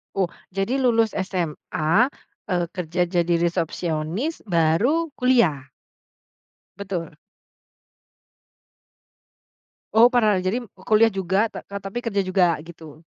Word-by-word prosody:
Oh, 190 Hz, -3 st, +1 dB, 0.2 s
jadi 195 Hz, +7 st, 0 dB
lulus 230 Hz, -4 st, +2 dB
SMA, 170 Hz, -4 st, -3 dB, 0.6 s
eee, 180 Hz, -4 st, 0 dB
kerja 175 Hz, 0 st, -1 dB
jadi 175 Hz, -1 st, +1 dB
resepsionis, 170 Hz, -, -2 dB
baru 200 Hz, -, +2 dB
kuliah? 235 Hz, -, +2 dB, 1.1 s
Betul. 185 Hz, -6 st, -5 dB, 2.8 s
Oh 235 Hz, +2 st, +7 dB
pernah, 215 Hz, -7 st, +2 dB
jadi 185 Hz, +5 st, -1 dB, 0.3 s
kuliah 220 Hz, +1 st, +5 dB
juga 190 Hz, +3 st, +1 dB
ka 200 Hz, -, -7 dB
tapi 200 Hz, +4 st, -5 dB
kerja 205 Hz, -5 st, -1 dB
juga 180 Hz, -3 st, +2 dB
gitu? 160 Hz, -2 st, -13 dB
190 Hz, 95 wpm, -23 LUFS, 170-225 Hz, 2.8 s, Oh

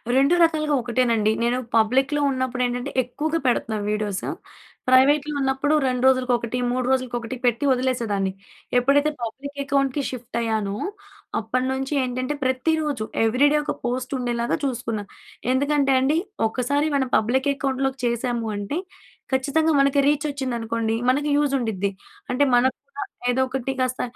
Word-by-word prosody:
2 275 Hz, +6 st, +4 dB
రకాలుగా 310 Hz, -2 st, +2 dB
ఒకటేనండి. 230 Hz, -3 st, +1 dB
నేను 240 Hz, +1 st, +1 dB, 0.2 s
పబ్లిక్‌లో 265 Hz, +6 st, +3 dB
ఉన్నప్పుడు 255 Hz, -1 st, -2 dB
ఏంటంటే, 245 Hz, +3 st, -3 dB
ఎక్కువగా 305 Hz, +6 st, -2 dB
పెడుతున్నాను 220 Hz, -4 st, 0 dB
వీడియోసు, 210 Hz, -2 st, -2 dB, 0.6 s
ప్రైవేట్‍లో 285 Hz, +3 st, +4 dB
ఉన్నప్పుడు 270 Hz, +2 st, +1 dB
2 250 Hz, -1 st, -1 dB
రోజులకి 255 Hz, -1 st, +3 dB
ఒకటి, 235 Hz, +1 st, -4 dB
3 255 Hz, 0 st, -1 dB
రోజులకి 255 Hz, -2 st, 0 dB
ఒకటి 235 Hz, +2 st, -6 dB
పెట్టి 240 Hz, +3 st, +2 dB
వదిలేసేదాన్ని. 235 Hz, -7 st, 0 dB, 0.5 s
ఎప్పుడైతే 285 Hz, +4 st, +3 dB
పబ్లిక్ 280 Hz, +5 st, -6 dB
అకౌంట్‌కి 275 Hz, 0 st, +1 dB
షిఫ్ట్ 245 Hz, -2 st, -6 dB
అయ్యానో, 215 Hz, -3 st, -1 dB, 0.6 s
అప్పటినుంచి 260 Hz, +5 st, -2 dB
ఏంటంటే 255 Hz, +2 st, -2 dB
ప్రతిరోజు 280 Hz, 0 st, 0 dB, 0.2 s
ఎవ్రీ 250 Hz, +6 st, +4 dB
డే 300 Hz, -, +3 dB
ఒక -, -, -2 dB
పోస్ట్ 255 Hz, +1 st, -2 dB
ఉండేలాగా 240 Hz, -1 st, -1 dB
చూసుకున్నా. 230 Hz, -5 st, -2 dB, 0.5 s
ఎందుకంటే, 280 Hz, +1 st, +2 dB
అండి 280 Hz, +4 st, +2 dB, 0.3 s
ఒకసారి 275 Hz, +6 st, 0 dB
మనం 265 Hz, -1 st, 0 dB
పబ్లిక్ 260 Hz, +6 st, +1 dB
అకౌంట్‍లోకి 270 Hz, 0 st, -1 dB
చేశాము 235 Hz, -1 st, -1 dB
అంటే, 205 Hz, +9 st, -3 dB, 0.5 s
ఖచ్చితంగా 285 Hz, +5 st, +2 dB
మనకి 275 Hz, 0 st, +3 dB
రీచ్ 295 Hz, +1 st, +2 dB
వచ్చిందనుకోండి 230 Hz, -4 st, -2 dB, 0.2 s
మనకి 290 Hz, +3 st, +1 dB
యూజ్ 290 Hz, -1 st, +1 dB
ఉండిద్ది. 210 Hz, -6 st, -1 dB, 0.4 s
అంటే, 255 Hz, +3 st, +2 dB
మనకు 255 Hz, +2 st, +3 dB
కూడా 470 Hz, -, -6 dB, 0.3 s
ఏదో 255 Hz, +2 st, +1 dB
ఒకటి 265 Hz, 0 st, -3 dB
కాస్త 255 Hz, 0 st, 0 dB
255 Hz, 135 wpm, -23 LUFS, 235-275 Hz, 0.6 s, 2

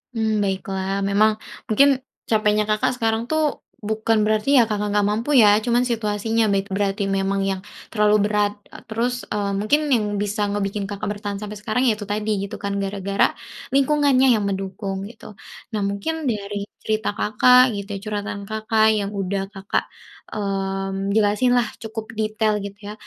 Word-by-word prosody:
Mmm, 220 Hz, -2 st, +1 dB
baiklah. 195 Hz, 0 st, -2 dB
Memang 215 Hz, +2 st, +3 dB, 0.2 s
mungkin 275 Hz, +5 st, +4 dB, 0.3 s
capeknya 215 Hz, -1 st, +3 dB
Kakak 215 Hz, +4 st, +1 dB
sekarang 225 Hz, 0 st, +1 dB
tuh 310 Hz, +2 st, -1 dB, 0.2 s
bukan 220 Hz, 0 st, +1 dB
berarti 215 Hz, +6 st, +2 dB
ya -, -, +5 dB
Kakak 210 Hz, -1 st, -1 dB
nggak 205 Hz, -1 st, +3 dB
mampu 230 Hz, +8 st, -1 dB
ya, 210 Hz, -4 st, +7 dB
cuma 240 Hz, 0 st, +3 dB
situasinya 225 Hz, -1 st, 0 dB
baik 195 Hz, 0 st, -1 dB
berarti 200 Hz, +1 st, 0 dB
memang 195 Hz, 0 st, 0 dB
yang 195 Hz, -1 st, -1 dB, 0.3 s
terlalu 210 Hz, -1 st, +3 dB
berat, 210 Hz, -1 st, +1 dB, 0.2 s
eee, -, -, -10 dB
terus, 245 Hz, +3 st, -2 dB
eee, 205 Hz, -1 st, -1 dB
mungkin 215 Hz, +9 st, +3 dB
yang 225 Hz, -5 st, +3 dB, 0.2 s
bisa 205 Hz, 0 st, -1 dB
ngebikin 200 Hz, 0 st, -2 dB
Kakak 205 Hz, 0 st, -4 dB
bertahan 205 Hz, -1 st, -4 dB
sampai 210 Hz, 0 st, -6 dB
sekarang 215 Hz, +4 st, -1 dB
ya 230 Hz, -5 st, +3 dB
itu 205 Hz, -, -5 dB
tadi 210 Hz, +1 st, -2 dB, 0.2 s
gitu 200 Hz, -, -7 dB
kan 200 Hz, 0 st, -1 dB
gara-gara 195 Hz, 0 st, 0 dB, 0.4 s
lingkungannya 275 Hz, -1 st, +4 dB
yang 205 Hz, -, -2 dB
mendukung 195 Hz, 0 st, -4 dB
gitu. 220 Hz, -2 st, -13 dB, 0.4 s
Nah 210 Hz, -, -1 dB
mungkin 200 Hz, +12 st, -2 dB
dari 205 Hz, -1 st, -4 dB, 0.2 s
cerita 215 Hz, 0 st, -1 dB
Kakak 250 Hz, +3 st, +5 dB
gitu, 200 Hz, +1 st, -6 dB
curhatan 205 Hz, -1 st, -4 dB
Kakak 220 Hz, 0 st, +2 dB
yang 200 Hz, -1 st, -2 dB
sudah 195 Hz, -1 st, -2 dB
Kakak, 195 Hz, 0 st, -2 dB, 0.5 s
mmm, 195 Hz, -1 st, -2 dB
jelasin 215 Hz, +4 st, +2 dB
lah 235 Hz, -3 st, +2 dB, 0.2 s
cukup 220 Hz, 0 st, -5 dB
detail 215 Hz, 0 st, 0 dB
gitu 200 Hz, 0 st, -8 dB
ya. 210 Hz, -, -5 dB
210 Hz, 160 wpm, -22 LUFS, 200-220 Hz, 0.5 s, ya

